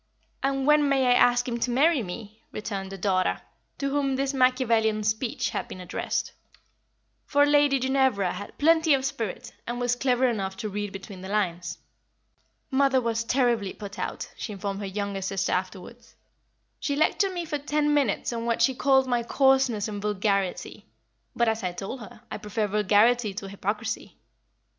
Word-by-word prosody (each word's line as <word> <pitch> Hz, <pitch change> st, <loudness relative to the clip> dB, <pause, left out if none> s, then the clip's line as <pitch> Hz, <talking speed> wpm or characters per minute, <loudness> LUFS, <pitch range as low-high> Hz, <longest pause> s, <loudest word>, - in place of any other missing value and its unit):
"And 270 Hz, 0 st, 0 dB
when 300 Hz, -1 st, +4 dB
may 270 Hz, -1 st, +3 dB
I -, -, +7 dB
ask 245 Hz, 0 st, +4 dB
him 235 Hz, -1 st, -2 dB
to 245 Hz, -, 0 dB
marry 285 Hz, +4 st, +3 dB
me?" 215 Hz, +3 st, -8 dB
returned 200 Hz, -3 st, -5 dB
the 195 Hz, -, -6 dB
daughter, 185 Hz, -1 st, +1 dB, 0.4 s
to 275 Hz, -1 st, -2 dB
whom 275 Hz, -1 st, +1 dB
this 275 Hz, +1 st, -1 dB
Machiavellian 235 Hz, -5 st, +2 dB
speech 230 Hz, +5 st, -1 dB
had -, -, -3 dB
been -, -, -9 dB
addressed; 180 Hz, -1 st, -3 dB, 1.0 s
for 285 Hz, 0 st, +4 dB
Lady 290 Hz, -1 st, +4 dB
Ginevra 260 Hz, -8 st, +1 dB
had 205 Hz, +3 st, -8 dB
plenty 320 Hz, 0 st, +4 dB
of 265 Hz, -1 st, -2 dB
spirit, 235 Hz, -8 st, -4 dB
and 240 Hz, +1 st, -3 dB
was 245 Hz, 0 st, +1 dB
clever 255 Hz, 0 st, +2 dB
enough 195 Hz, -5 st, -2 dB
to 215 Hz, -1 st, -4 dB
read 205 Hz, 0 st, -4 dB
between 195 Hz, -1 st, -9 dB
the 190 Hz, -, -7 dB
lines. 180 Hz, -4 st, -1 dB, 0.9 s
"Mother 270 Hz, 0 st, +3 dB
was 230 Hz, -2 st, -1 dB
terribly 235 Hz, -5 st, +1 dB
put 200 Hz, -2 st, -9 dB
out," -, -, -4 dB
she 215 Hz, -, -5 dB
informed 200 Hz, 0 st, -4 dB
her 200 Hz, -, -4 dB
younger 200 Hz, 0 st, -3 dB
sister 190 Hz, 0 st, -1 dB
afterwards. 190 Hz, +6 st, -5 dB, 0.6 s
"She 285 Hz, -, -1 dB
lectured 375 Hz, +6 st, +2 dB
me 350 Hz, -1 st, -3 dB
for 300 Hz, -2 st, -3 dB
ten 295 Hz, +1 st, +1 dB
minutes 270 Hz, -5 st, +1 dB
on 230 Hz, 0 st, -3 dB
what 235 Hz, 0 st, +2 dB
she 265 Hz, -, +4 dB
called 265 Hz, +1 st, +3 dB
my 245 Hz, -2 st, +1 dB
coarseness 265 Hz, -3 st, +2 dB
and 205 Hz, -1 st, -5 dB
vulgarity; 200 Hz, -2 st, -1 dB, 0.5 s
but, 235 Hz, -, +2 dB
as 220 Hz, 0 st, 0 dB
I 180 Hz, -1 st, -2 dB
told 195 Hz, +8 st, -6 dB
her, 215 Hz, -1 st, -12 dB
I -, -, -4 dB
prefer 210 Hz, +1 st, -2 dB
vulgarity 210 Hz, +2 st, +3 dB
to 195 Hz, -1 st, -5 dB
hypocrisy. 210 Hz, +3 st, -4 dB
230 Hz, 170 wpm, -26 LUFS, 200-265 Hz, 1.0 s, I